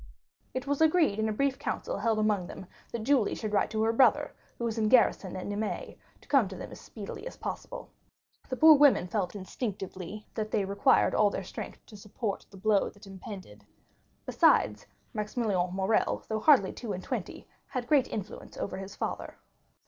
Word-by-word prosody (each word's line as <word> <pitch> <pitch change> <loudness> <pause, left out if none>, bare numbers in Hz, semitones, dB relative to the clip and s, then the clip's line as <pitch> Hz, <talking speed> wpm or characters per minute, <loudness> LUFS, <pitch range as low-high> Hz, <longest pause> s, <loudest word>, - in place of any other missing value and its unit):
It 255 +1 -2
was 285 +2 -1
agreed 315 - +4
in 220 0 +1
a - - 0
brief 270 +4 0
council - - -3
held 220 +1 +1
among 210 -4 +1
them, 190 - -9 0.3
that 235 -2 -4
Julie 260 -3 +2
should 215 -2 -4
write 200 - +2
to 220 0 0
her 225 +1 +2
brother, 255 +2 +4 0.2
who - - -5
was 225 -1 -2
in 215 -1 +2
garrison 210 -6 +3
at 185 - -5
Nîmes, 205 +1 -3 0.3
to - - -21
come 275 -7 +4
to 190 - -8
them - - -8
as - - -10
speedily 215 - -8
as - - -9
possible. - - -6 0.6
The 260 - -1
poor 315 +3 +9
women 285 -10 +5
felt 190 -1 -2
instinctively 195 -1 -5
that 215 -1 -3
they 205 -2 0
required 200 +8 +3
all 210 -1 +4
their 195 - -4
strength - - -8
to 215 - -14
support 210 +1 -5
the 195 - -13
blow 205 +1 +2
that 205 - -16
impended. 190 - -10 0.6
Besides, 105 0 +3 0.3
Maximilian 210 -4 -1
Morrel, 195 +3 +1
though 220 -1 -1
hardly 250 -6 +5
two 225 -5 -5
and 185 - -6
twenty, - - -5 0.2
had 255 -3 -3
great 275 0 +3
influence 205 -1 -7
over - - -4
his 195 +1 -8
father. - - -4
215 Hz, 185 wpm, -29 LUFS, 195-240 Hz, 0.6 s, poor